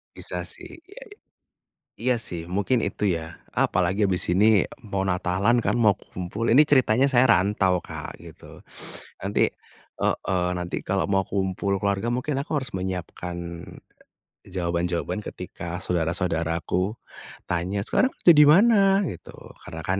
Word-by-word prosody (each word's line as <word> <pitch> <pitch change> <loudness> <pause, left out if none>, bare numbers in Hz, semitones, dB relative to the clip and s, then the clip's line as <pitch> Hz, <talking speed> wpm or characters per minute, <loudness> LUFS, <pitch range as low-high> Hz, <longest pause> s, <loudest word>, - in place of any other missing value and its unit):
Bisa - - -4
sih 335 - -9
iya, - - -11 1.0
iya 125 +2 +1
sih 85 -6 -5
mungkin 100 +8 0
itu - - -4
ya, 80 0 -10
apalagi 95 +3 +1
habis 95 -2 +1
ini 95 +4 +4 0.4
mau 100 -2 -2
natalan 90 +6 +1
kan - - +1
mau 110 -4 +4
ku - - -21
kumpul, 90 +5 -4
ini 140 - +8
ceritanya 130 -2 +4
saya 125 -1 +5
rantau, 95 -1 +2
Kak, - - -8
gitu, - - -13 0.6
nanti 100 +2 +1 0.5
heeh, 90 -2 0
nanti 90 0 -4
kalau 95 0 0
mau 95 -1 +2
kumpul 95 0 -1
keluarga 100 +2 0
mungkin 125 +4 -2
aku 140 - -6
harus 135 -2 -2
menyiapkan, 90 -1 -5 1.0
e - - -23
jawaban-jawaban 85 +2 -2
ketika 85 -4 -7
saudara-saudaraku 85 +3 -1 0.5
tanya, 90 +3 -1
"Sekarang 260 - +2
kerja 170 - +6
di 150 -1 +7
mana?" 195 +3 +5
Gitu, 105 - -7 0.3
karena 80 - -7
kan 95 +1 0
95 Hz, 140 wpm, -24 LUFS, 90-120 Hz, 1.0 s, ini